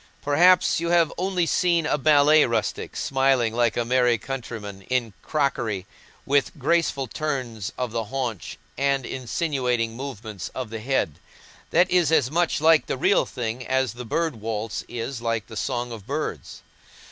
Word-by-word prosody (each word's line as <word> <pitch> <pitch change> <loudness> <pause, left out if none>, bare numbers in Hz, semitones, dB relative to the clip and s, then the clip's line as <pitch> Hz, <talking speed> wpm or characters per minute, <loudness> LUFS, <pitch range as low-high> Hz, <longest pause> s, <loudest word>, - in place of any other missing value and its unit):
Perhaps 175 +7 +4
you 170 0 -2
have 170 -3 +3
only 180 -1 0
seen 170 -1 +2
a 150 - +2
ballet 150 +1 +5
rustic, 115 -2 -2
smiling 135 -4 +1
like 120 -1 +1
a 120 - 0
merry 125 -1 +3
countryman 110 -5 -6
in 125 -4 0
crockery, 120 - -1 0.4
with 140 +3 +1
graceful 150 -1 +1
turns 125 - -4
of 125 -2 -2
the 115 -1 -2
haunch 115 -5 -4 0.2
and 140 -2 +1
insinuating 125 -3 -1
movements 110 -7 -6
of 125 -4 -5
the 115 - -4
head. 110 - -1 0.5
That 175 +2 +4
is 175 -4 +3
as 135 -5 +3
much 170 +1 +1
like 160 0 +4
the - - -2
real - - +3
thing 120 0 -4
as 130 -3 +1
the 125 +1 -7
"Bird 155 +3 -1
Waltz" 110 0 -4
is 120 +1 -5
like 115 -3 -1
the 110 - -11
song 120 +2 -2
of 110 -4 -9
birds. - - -4
130 Hz, 160 wpm, -24 LUFS, 115-150 Hz, 0.5 s, ballet